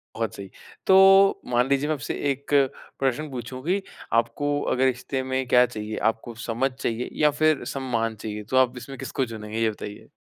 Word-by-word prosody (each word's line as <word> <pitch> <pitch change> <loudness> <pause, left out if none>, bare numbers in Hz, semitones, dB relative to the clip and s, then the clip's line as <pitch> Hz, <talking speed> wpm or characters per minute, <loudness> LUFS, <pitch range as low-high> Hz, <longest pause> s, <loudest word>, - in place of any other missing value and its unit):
बहुत 115 -2 -2
सही। 100 -1 -8 0.4
तो 195 +1 +7
मान 120 +2 +3
लीजिए 140 +2 +2
मैं - - +2
आपसे 145 - -4 0.2
एक 140 +2 -7 0.5
प्रश्न 135 +3 0
पूछूँ 130 +1 -6
कि 190 +3 +1 0.3
आपको 145 +5 +1
अगर 130 +1 +2
रिश्ते 130 +1 -1
में 130 0 -1
क्या 125 0 +6
चाहिए? 110 -2 -6
आपको 115 +2 -1
समझ 125 +4 0
चाहिए 120 -2 -3
या 150 -1 +5
फिर 155 -2 +3
सम्मान 115 -4 -1
चाहिए 105 0 -6
तो 130 - +1
आप 130 -1 +3
इसमें 135 +2 -8
किसको 135 0 -2
चुनेंगे, 110 -1 -7
ये 115 - +3
बताइए? 105 -1 -8
130 Hz, 180 wpm, -25 LUFS, 115-140 Hz, 0.5 s, तो